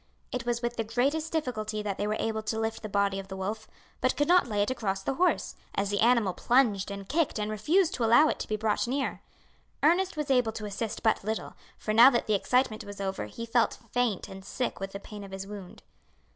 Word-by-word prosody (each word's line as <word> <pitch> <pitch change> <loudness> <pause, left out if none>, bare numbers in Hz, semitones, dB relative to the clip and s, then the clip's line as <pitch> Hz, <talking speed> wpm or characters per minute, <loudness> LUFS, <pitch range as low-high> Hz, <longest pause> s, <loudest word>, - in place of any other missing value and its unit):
It 245 -1 -4
was 235 0 -1
with 240 0 -2
the 225 - 0
greatest 275 +8 0
difficulty 215 -9 -2
that 200 -2 -3
they 205 - 0
were 215 +1 0
able 220 -1 -1
to 220 +1 -2
lift 225 0 -2
the 215 - -6
body 200 -1 +1
of 195 - -8
the 190 - -7
wolf, 215 +3 -4 0.3
but 255 - +1
could 290 - +2
not 355 -4 +5
lay 205 -3 +1
it 205 - -1
across 195 -6 -2
the 270 - -1
horse, 360 +6 +1 0.2
as 200 0 0
the 205 - 0
animal 230 -5 +4
plunged 225 -4 +2
and 200 -1 -7
kicked 320 0 +1
and 210 0 -2
refused 325 - +2
to 245 - -2
allow 240 +7 +6
it - - -1
to - - -4
be 215 - -1
brought 215 +1 0
near. 270 +2 -2 0.6
Ernest 355 +3 +3
was 300 -2 -1
able 245 -4 +3
to 215 -1 -5
assist 210 +2 -4
but 220 -3 +2
little, 220 +2 -3 0.2
for 215 - -2
now 235 +4 +9
that 240 -3 0
the 215 - +1
excitement 240 +2 +1
was 205 0 -9
over 190 - -3
he 230 - -7
felt 230 0 +2
faint 245 -6 0
and 190 0 -10
sick 250 +5 -3
with 195 0 -5
the 200 - -5
pain 205 0 -9
of 200 - -9
his 195 0 -6
wound. 200 -3 -10
220 Hz, 240 wpm, -29 LUFS, 205-250 Hz, 0.6 s, now